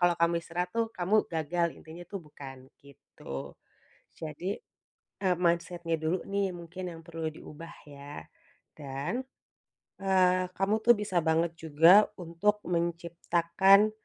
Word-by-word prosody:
kalau 175 0 +4
kamu 170 0 +4
istirahat 175 +2 -3
tuh, 230 0 +2
kamu 195 +4 +2
gagal, 170 +2 0
intinya 165 +2 -11
tuh, 200 - -5
bukan 135 -3 -11
gitu. 125 - -9 0.7
Jadi, 165 +6 -4 0.7
eee, 180 -2 +3
mindset-nya 170 0 +1
dulu 160 +3 0
nih, 195 -1 0
mungkin, 175 +2 -7
yang 165 - -10
perlu 165 -1 -3
diubah, 165 +2 -11
ya. 145 0 -9 0.6
Dan, 145 - -3 0.8
eee, 185 -1 +3
kamu 195 +3 +2
tuh 240 - +9
bisa 205 -4 -2
banget 160 +1 +2
juga, 165 +6 +6
untuk 180 +5 0
menciptakan, 170 +4 +3
170 Hz, 125 wpm, -30 LUFS, 160-185 Hz, 0.8 s, tuh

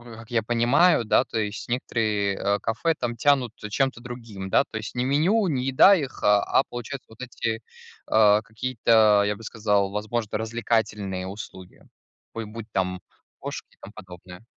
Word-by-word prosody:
как 110 0 -13
я 115 -2 0
понимаю, 120 +7 +3
да, 110 - +3
то 115 - -4
есть, 105 -1 -4
некоторые, 110 -5 -1
а, 100 +1 0
кафе 120 +11 0
там 120 -1 -2
тянут 125 -2 +2
чем-то 120 +4 -1
другим, 115 -6 -8
да, 140 - +3
то - - -5
есть 110 -1 -6
не 125 - 0
меню, 175 - +2
не 130 -6 -1
еда 135 +9 +6
их, 145 -7 -4
а 105 +4 +4
получается, 120 +3 -7
вот 110 - -15
эти, 115 -2 -3 0.5
а, 105 -1 +5
какие-то, 110 -2 +3
я 105 0 0
бы 115 - -13
сказал, 105 -3 0
возможно, 105 +1 -3
развлекательные 110 -4 -2
услуги, 95 -2 -10 0.5
бу 115 - -3
э, - - -6
будь 110 +1 -9
там 90 -2 -2 0.4
кошки - - -6
и - - -29
тому - - -11
подобное. 90 +2 -12
110 Hz, 170 wpm, -25 LUFS, 105-125 Hz, 0.5 s, еда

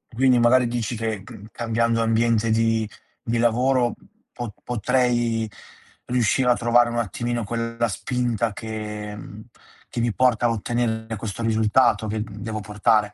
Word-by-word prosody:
Quindi 130 0 +4
magari 120 +1 +5
dici 120 0 -2
che 110 -3 -3
mhmm, 100 +1 -11
cambiando 115 0 0
ambiente 115 0 +2
di 115 0 +2 0.3
di 115 +1 -1
lavoro 120 +1 +2 0.4
po 120 -3 -5
potrei 120 -1 +1 0.6
riuscire 125 +1 +2
a 120 - +5
trovare 120 0 +3
un 120 - -3
attimino 120 +2 -2
quella 115 +2 -2
spinta 120 0 -1
che 105 -1 -6
mhmm, 105 +1 -10 0.4
che - - -5
mi 120 -1 +1
porta 125 -2 +2
a - - +1
ottenere 115 0 -2
questo 110 +1 -5
risultato 110 0 +3
che, 110 +1 -2
uhm, 105 -1 -5
devo 110 0 -4
portare? 105 +1 +1
115 Hz, 145 wpm, -23 LUFS, 110-120 Hz, 0.6 s, magari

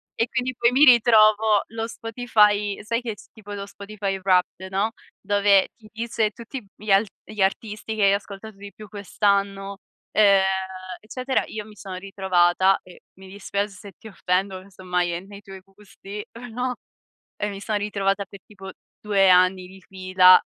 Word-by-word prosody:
E 230 - 0
quindi, 255 +1 -2
poi, 235 0 +3
mi 275 +4 +6
ritrovo 220 -4 +5
lo 225 0 -4
Spotify 215 -3 +1
sai 230 +2 -1
che, 230 -3 -5 0.2
tipo, 210 -2 -12
lo 200 -1 -5
Spotify 200 -1 -5
Wrapped, 185 0 0
no, 200 +4 0 0.3
dove 200 -1 +3
ti 215 -2 -18
dice 225 -1 -1
tutti 235 +3 -9
gli 210 -1 -5
alt 200 +3 +4 0.2
gli 215 -1 -6
artisti 215 +2 -2
che 215 - 0
hai 195 0 +5
ascoltato 200 +1 -6
di 200 0 -10
più 215 - -12
quest'anno, 200 -1 -1 0.3
ehm, 200 -2 +5 0.6
eccetera. 255 +4 -2
Io 215 -1 -6
mi 215 -1 -15
sono 190 -1 -8
ritrovata, 190 -1 +2
eh, 180 - -16 0.2
mi 190 0 -13
dispiace 200 +1 -3
se 200 +1 -12
ti - - -13
offendo, 190 -1 -2
casomai 180 -2 -3
è 170 - -3
nei 200 +1 -12
tuoi 195 -1 -11
gusti, 200 +1 -11 0.3
no, 250 +2 -2 0.6
e 210 - -3
mi 195 -1 -7
sono 210 0 -1
ritrovata 200 -1 -1
per 195 +1 -13
tipo 195 -2 -11 0.3
2 200 -2 +3
anni 185 0 +4
di 190 +1 -15
fila, 185 -1 +5
200 Hz, 165 wpm, -23 LUFS, 195-215 Hz, 0.6 s, mi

